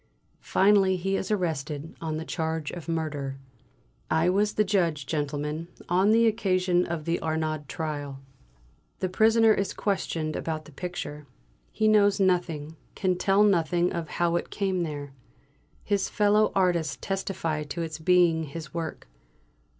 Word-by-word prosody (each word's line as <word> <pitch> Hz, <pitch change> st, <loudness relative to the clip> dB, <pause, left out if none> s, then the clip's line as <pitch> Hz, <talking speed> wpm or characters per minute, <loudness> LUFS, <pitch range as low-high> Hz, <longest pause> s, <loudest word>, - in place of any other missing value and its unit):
Finally 195 Hz, -1 st, +4 dB
he 190 Hz, +2 st, -1 dB
is 190 Hz, -, -2 dB
arrested 160 Hz, -6 st, -2 dB
on 160 Hz, -1 st, -2 dB
the 160 Hz, -, -5 dB
charge 160 Hz, -2 st, -2 dB
of 170 Hz, -2 st, -8 dB
murder. 145 Hz, -4 st, -3 dB, 0.7 s
I 160 Hz, +3 st, +3 dB
was 205 Hz, +2 st, +1 dB
the 215 Hz, -, +3 dB
judge, 170 Hz, -8 st, 0 dB
gentlemen, 150 Hz, +2 st, -3 dB, 0.2 s
on 185 Hz, +4 st, +3 dB
the 230 Hz, +1 st, +5 dB
occasion 185 Hz, -5 st, +2 dB
of 165 Hz, -3 st, -4 dB
the 170 Hz, +1 st, 0 dB
Arnaud 155 Hz, -1 st, -2 dB
trial. 145 Hz, -4 st, -4 dB, 0.8 s
The 185 Hz, -, -2 dB
prisoner 225 Hz, +3 st, +5 dB
is 195 Hz, -2 st, -2 dB
questioned 165 Hz, -6 st, -2 dB
about 155 Hz, -1 st, -3 dB
the -, -, -13 dB
picture. 150 Hz, -2 st, -6 dB, 0.4 s
He 215 Hz, -, +1 dB
knows 205 Hz, -2 st, +4 dB
nothing; 170 Hz, -5 st, 0 dB, 0.2 s
can 185 Hz, -2 st, +1 dB
tell 195 Hz, +3 st, +3 dB
nothing 175 Hz, -3 st, +2 dB
of 170 Hz, -3 st, -4 dB
how 170 Hz, 0 st, +2 dB
it -, -, -4 dB
came 190 Hz, -3 st, -1 dB
there. 145 Hz, -4 st, -5 dB, 0.7 s
His 200 Hz, -1 st, 0 dB
fellow 210 Hz, +1 st, +3 dB
artists 175 Hz, -5 st, +1 dB
testify 185 Hz, -5 st, -2 dB
to 150 Hz, +4 st, -4 dB
its 160 Hz, -1 st, -5 dB
being 170 Hz, -1 st, +3 dB
his 155 Hz, +2 st, -8 dB
work. 165 Hz, -, -5 dB
170 Hz, 145 wpm, -27 LUFS, 155-195 Hz, 0.8 s, the